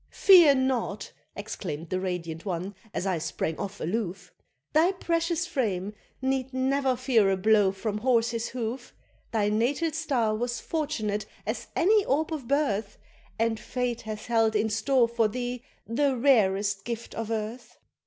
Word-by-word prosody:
"Fear 345 -8 +7
nought," 260 -6 -1 0.2
exclaimed 170 -6 -6
the 185 - 0
radiant 170 -3 -4
one, 185 0 -3 0.2
as 190 - -3
I 185 -4 0
sprang 160 0 -3
off 200 0 -5
aloof, 185 -1 -3 0.4
"Thy 335 +5 +4
precious 335 -2 0
frame 210 - -2 0.3
need 265 -1 0
never 265 0 +1
fear 240 -5 +3
a 190 - +1
blow 205 0 +4
from 210 +2 -3
horse's 230 -1 +1
hoof! 240 +1 -5 0.4
Thy 210 -2 +1
natal 255 +10 +1
star 275 -8 0
was 240 +1 -2
fortunate 215 -10 -2 0.2
as - - -3
any 415 +4 +4
orb 315 +4 0
of 280 -6 -5
birth, 225 -8 0 0.4
And 225 -1 0
fate 245 -1 -3
hath 215 -1 -6
held 225 -2 +2
in 215 +1 +1
store 235 +3 +3
for 230 -1 +1
thee 245 +2 -4 0.2
the 265 +4 +1
rarest 200 -6 +3
gift 235 -1 -5
of 225 -1 -4
earth." 225 +2 -4
230 Hz, 150 wpm, -27 LUFS, 205-265 Hz, 0.4 s, Fear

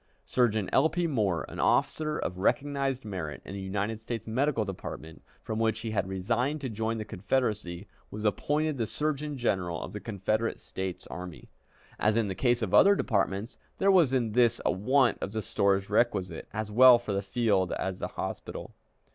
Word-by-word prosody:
Surgeon 110 -5 +1
L. 145 +4 +5
P. 175 +1 -1
Moore, 105 - 0
an - - -9
officer 155 -1 +1
of 90 +1 -4
recognized 135 +4 0
merit 90 -7 -5
in - - -8
the 100 - -5
United 100 +3 -2
States 115 -1 -5
Medical 125 0 +1
Department, 80 -4 -7 0.2
from 110 0 -3
which 110 -1 +1
he 115 -1 -4
had 100 -3 0
resigned 115 +10 -1
to 130 - -3
join 110 +1 -2
the 110 - -4
Confederacy, 100 -4 -2 0.2
was 105 +1 -7
appointed 145 +7 0
the 115 - 0
Surgeon 150 +1 -2
General 95 -8 -1
of - - -7
the 105 - -4
Confederate 110 +2 -1
States 95 -1 -5
Army. 90 -3 -8 0.5
As 105 +1 +2
in 110 -3 +1
the - - -2
case 120 +5 +1
of 100 - -3
other 200 +1 +7
departments, 105 - -1 0.2
there 195 - +4
was 170 -8 +5
in 120 -4 +1
this 120 0 +3
a - - +4
want 125 +6 +2
of 100 - -4
the 110 - -1
stores 100 0 +1
requisite, 100 -6 0
as 110 0 -4
well 125 +2 +8
for 115 -3 -4
the 100 - 0
field 100 -3 +1
as 95 -1 -3
the - - -2
hospital. - - -6
110 Hz, 185 wpm, -29 LUFS, 95-130 Hz, 0.5 s, well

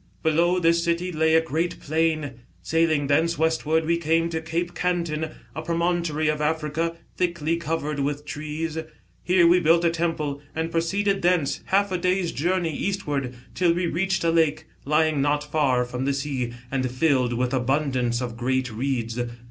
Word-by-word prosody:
Below 170 +3 +3
this 170 -1 +3
city 170 +1 0
lay 160 0 +2
a 160 - +6
great 165 +2 -2
plain. 155 -4 -1 0.2
Sailing 160 - +2
thence 160 +4 +2
westward 160 0 +1
we 170 +1 +2
came 165 0 +1
to 160 -1 -3
Cape 170 +2 -2
Cantin, 170 -3 -1 0.3
a 155 - -3
promontory 170 -1 0
of 150 0 0
Africa 160 +2 -1 0.2
thickly 170 -2 0
covered 155 -3 -2
with 145 +1 -2
trees. 155 +2 -4 0.4
Here 180 -1 +4
we 175 +2 +6
built 170 +1 +4
a 170 - +4
temple, 160 -4 -2
and 160 +1 -2
proceeded 195 +4 0
thence^ 175 -5 +1
half 200 +1 +2
a 185 - 0
day's 180 -1 +1
journey 170 +1 0
eastward,, 145 -11 -2 0.2
till 175 -2 +3
we 175 +1 -1
reached 185 +2 0
a 165 - +3
lake, 160 -1 +2 0.2
lying 155 0 +2
not 145 +1 +1
far 145 -5 +1
from 125 +1 -4
the 140 - +1
sea, 135 -3 -2 0.2
and 130 -2 0
filled 130 -2 +2
with 125 +2 -1
abundance 130 -2 0
of 120 -2 -5
great 130 +1 -1
reeds. 120 -1 -2
160 Hz, 165 wpm, -24 LUFS, 145-170 Hz, 0.4 s, a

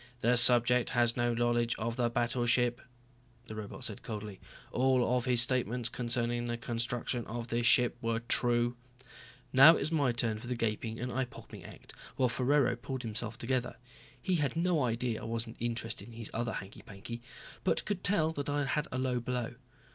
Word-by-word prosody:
"The 120 +1 +3
subject 120 0 +5
has 120 -1 +4
no 120 -1 +1
knowledge 120 0 +1
of 115 +1 -3
the 120 -1 +1
battleship," 120 0 +1 0.6
the - - -8
robot 110 +4 -7
said 105 - -6
coldly. 105 -3 -6 0.3
"All 125 -1 +2
of 125 0 0
his 125 -2 +5
statements 125 -1 0
concerning 120 0 -1
the 120 0 -2
construction 120 +1 -2
of 115 +1 -5
this 120 0 +1
ship 125 -2 +4
were 115 0 0
true." 120 0 +2 0.8
Now 135 +6 +9
it - - -2
was 145 +3 -1
my 145 -6 +2
turn 115 -2 -1
for 120 - -9
the 125 - -2
gaping 115 0 -2
and 125 +2 -3
eye 130 +2 0
popping 125 - -12
act - - -12 0.2
while 130 -2 +2
Ferraro 125 +1 +2
pulled 130 +2 -6
himself 110 0 -4
together. 125 0 -2 0.4
He 180 +8 0
had 145 -3 -1
no 170 -3 +1
idea 115 -1 -1
I - - -7
wasn't 115 0 -4
interested 115 -1 -3
in 115 - -12
his 115 -2 -7
other 115 0 -2
hanky 95 +1 -7
panky, 110 +4 -9 0.4
but - - 0
could 195 -2 -3
tell 160 -5 +1
I 145 0 0
had 140 - -1
had 150 -1 0
a - - -3
low 130 -1 0
blow. 120 -1 -3
120 Hz, 185 wpm, -31 LUFS, 115-125 Hz, 0.8 s, Now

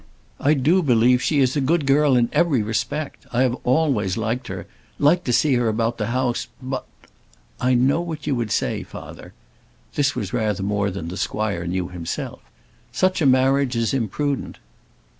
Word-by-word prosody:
I 150 +3 +3
do 155 +8 +3
believe 125 -3 +4
she 145 0 +2
is 130 +1 +2
a 145 - +1
good 155 +3 +1
girl 140 0 +4
in 120 -1 +3
every 150 -10 +2
respect. 115 +7 -3
I 125 +2 +2
have 125 -2 +2
always 125 - +1
liked 115 +3 -2
her; - - -6 0.3
liked 165 +5 +3
to 125 - 0
see 140 +4 +3
her 120 -2 +2
about 115 +2 -1
the 105 - -1
house. 125 0 -1
But 130 0 -5 0.4
" - - -36 0.3
"I 125 0 +3
know 135 +7 +3
what 160 -4 -6
you 145 - 0
would 120 -4 -2
say, 105 - -1
father." - - -10 0.6
This 135 -2 +1
was 105 -7 -4
rather 105 -5 0
more 100 0 0
than 90 -4 -5
the 90 - -6
squire 100 -6 -2
knew 90 0 -2
himself. 85 -2 -5 0.5
"Such 185 -2 +1
a 145 - +4
marriage 130 0 +3
is 115 +1 0
imprudent." 135 +3 -2
125 Hz, 180 wpm, -22 LUFS, 110-140 Hz, 0.6 s, believe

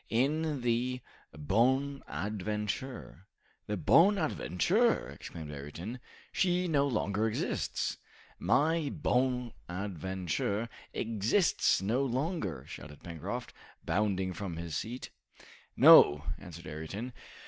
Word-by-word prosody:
"In 145 +4 +1
the 120 +1 0 0.3
'Bonadventure.'" 105 - -1 0.4
"The 105 - -2
'Bonadventure!'" 170 - +3
exclaimed 80 -3 -8
Ayrton. 80 - -7 0.3
"She 180 -1 +1
no 140 -4 +2
longer 110 -3 0
exists." 110 - -2 0.4
"My 160 0 +2
'Bonadventure' 100 - -2 0.2
exists 115 - +2
no 120 +7 +1
longer!" 130 - -2
shouted 75 -1 -10
Pencroft, 85 -3 -5 0.3
bounding 95 -3 0
from 90 -2 -5
his 85 -2 -5
seat. 120 +3 -5 0.7
"No," 75 0 +8 0.2
answered 85 -2 -10
Ayrton. 80 +11 -6
110 Hz, 85 wpm, -31 LUFS, 90-135 Hz, 0.7 s, No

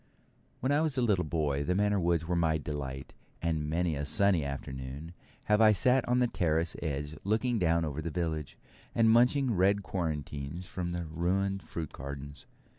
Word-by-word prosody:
When 130 - +1
I 145 +2 +3
was 155 -4 0
a 125 - +2
little 100 -6 +2
boy 75 -3 -1
the 90 +5 0
Manor 105 0 +2
woods 85 -2 +1
were 90 - 0
my 80 -2 +2
delight, 70 -3 -5 0.3
and 80 -3 -1
many 85 0 0
a 70 - -3
sunny 90 +3 +2
afternoon 70 +3 -6 0.3
have 105 +1 +3
I 110 -1 +7
sat 125 +7 +3
on 125 0 +2
the 125 - +4
terrace 80 -6 0
edge 75 -1 -3
looking 110 +3 +1
down 85 -2 +2
over 75 0 -4
the 85 - -3
village, 80 -4 -3 0.4
and 115 -1 +5
munching 125 +2 +4
red 100 +2 +3
quarantines 75 -2 -4
from 90 -1 -4
the 85 0 -3
ruined 95 +5 -1
fruit 80 -3 -5
gardens. 70 +1 -8
85 Hz, 180 wpm, -30 LUFS, 75-100 Hz, 0.4 s, I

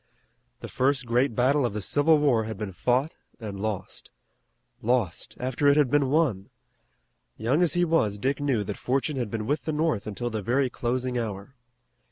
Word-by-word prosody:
The - - -6
first 135 0 0
great 120 +1 +1
battle 135 +4 +3
of 120 -4 -1
the 105 - -3
Civil 150 - +3
War 130 -7 +2
had 110 -2 -5
been 105 -1 -4
fought 125 - 0 0.3
and 105 -4 -6
lost. 105 -2 -5 0.7
Lost, 110 -7 -1
after 130 +3 0
it 140 +1 +5
had 145 -4 +3
been 145 -2 +3
won! 135 - +1 0.9
Young 125 +9 +1
as 175 -1 +2
he 175 0 +3
was 135 -12 +1
Dick 135 +7 -1
knew 135 -7 0
that 100 0 -6
fortune 135 +3 -1
had 120 -4 -2
been 105 0 -3
with 145 +6 -1
the 160 - -1
North 150 -9 0
until 120 +3 -4
the 110 -1 -3
very 125 +5 +1
closing 125 +1 -2
hour. 105 +1 -5
125 Hz, 185 wpm, -26 LUFS, 110-145 Hz, 0.9 s, it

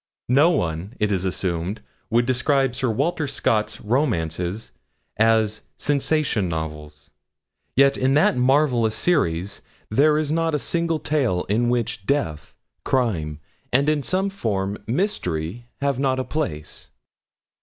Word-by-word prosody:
No 140 +7 +5
one, 90 - -2
it 105 -1 +1
is 95 -1 0
assumed, 90 +2 -2 0.3
would 120 +1 +3
describe 130 +1 +2
Sir 125 0 0
Walter 145 +7 0
Scott's 105 -4 0
romances 105 - -1 0.5
as 110 -1 +2 0.2
'sensation 145 - +1
novels;' 75 -2 -6 0.6
yet 140 +1 +5
in 130 +2 +2
that 150 - +4
marvellous 125 -3 +2
series 100 - 0 0.3
there 150 +6 +4
is 155 -1 0
not 165 -1 +1
a 145 - -2
single 170 -1 +1
tale 130 -13 0
in 120 +4 +2
which 120 -4 -1
death, 125 - -1 0.3
crime, 85 - 0 0.3
and, 140 +3 +3
in 155 -1 +1
some 190 +6 0
form, 100 - -2
mystery, 115 - -2
have 140 -2 0
not 135 -1 +1
a 130 - -1
place. 135 - -4
120 Hz, 130 wpm, -23 LUFS, 95-145 Hz, 0.6 s, No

